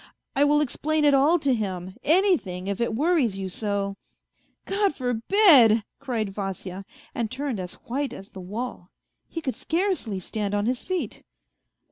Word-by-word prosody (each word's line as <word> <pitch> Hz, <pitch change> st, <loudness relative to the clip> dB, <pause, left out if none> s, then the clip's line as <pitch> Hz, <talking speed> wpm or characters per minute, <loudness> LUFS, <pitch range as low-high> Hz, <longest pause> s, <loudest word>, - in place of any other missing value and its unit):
I 280 Hz, -, +4 dB
will 295 Hz, +1 st, +4 dB
explain 300 Hz, +2 st, 0 dB
it 290 Hz, -, +5 dB
all 285 Hz, +6 st, +5 dB
to 280 Hz, -5 st, +1 dB
him, 190 Hz, -4 st, -3 dB
anything, 310 Hz, -, +2 dB
if 200 Hz, +2 st, -3 dB
it 235 Hz, -2 st, 0 dB
worries 285 Hz, -, +2 dB
you 190 Hz, -1 st, -4 dB
so... 200 Hz, 0 st, -2 dB, 0.2 s
." -, -, -49 dB
" -, -, -39 dB, 0.2 s
God 400 Hz, -5 st, +1 dB
forbid! 245 Hz, -, +5 dB
" -, -, -57 dB
cried 220 Hz, -6 st, -2 dB
Vasya, 195 Hz, -1 st, -5 dB, 0.3 s
and 230 Hz, -3 st, -2 dB
turned 260 Hz, -3 st, -3 dB
as 180 Hz, -1 st, -6 dB
white 275 Hz, +3 st, -2 dB
as 195 Hz, -, -10 dB
the 190 Hz, -, -10 dB
wall. 200 Hz, -1 st, -6 dB, 0.4 s
He 330 Hz, -, -5 dB
could 265 Hz, -5 st, -2 dB
scarcely 335 Hz, -, -1 dB
stand 205 Hz, +2 st, -3 dB
on 205 Hz, 0 st, 0 dB
his 245 Hz, +1 st, -1 dB
feet. 370 Hz, -1 st, -3 dB
235 Hz, 170 wpm, -25 LUFS, 200-295 Hz, 0.4 s, it